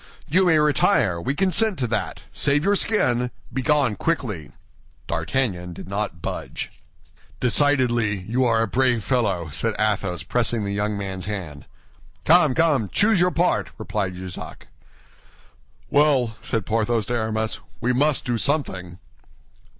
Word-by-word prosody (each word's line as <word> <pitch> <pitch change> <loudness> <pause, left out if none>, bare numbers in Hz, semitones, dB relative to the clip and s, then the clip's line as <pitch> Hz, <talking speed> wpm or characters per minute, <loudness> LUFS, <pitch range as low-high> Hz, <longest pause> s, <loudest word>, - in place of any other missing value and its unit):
"You 185 +4 +3
may 160 -2 +5
retire; 145 - +2
we 135 +11 -2
consent 195 +3 +2
to 130 - -1
that. 115 - -3
Save 145 +1 +2
your 200 +2 +3
skin; 125 - +2 0.2
begone 135 -3 +1
quickly." 105 - -2 0.6
D'Artagnan 90 +1 -2
did 85 - -10
not 100 -3 -4
budge. - - -5 0.7
"Decidedly, 120 -6 +2
you 120 +7 0
are 115 -2 +2
a - - -1
brave 125 -1 +1
fellow," 100 - 0
said 105 +8 -2
Athos, 100 -5 -1
pressing 120 -2 0
the 100 0 -3
young 105 +1 -1
man's 95 -2 -5
hand. 85 -9 -6 0.6
"Come, 160 -5 +5
come, 145 - +2
choose 210 - +3
your 180 +1 +4
part," 180 0 +1
replied 90 -2 -3
Jussac. 90 0 -9 1.2
"Well," 140 -6 +3
said 110 -4 -2
Porthos 115 0 0
to 120 - -3
Aramis, 110 -1 -1 0.2
"we 125 +2 0
must 145 +3 +1
do 120 -2 -1
something." 95 - -1
120 Hz, 135 wpm, -23 LUFS, 100-145 Hz, 1.2 s, may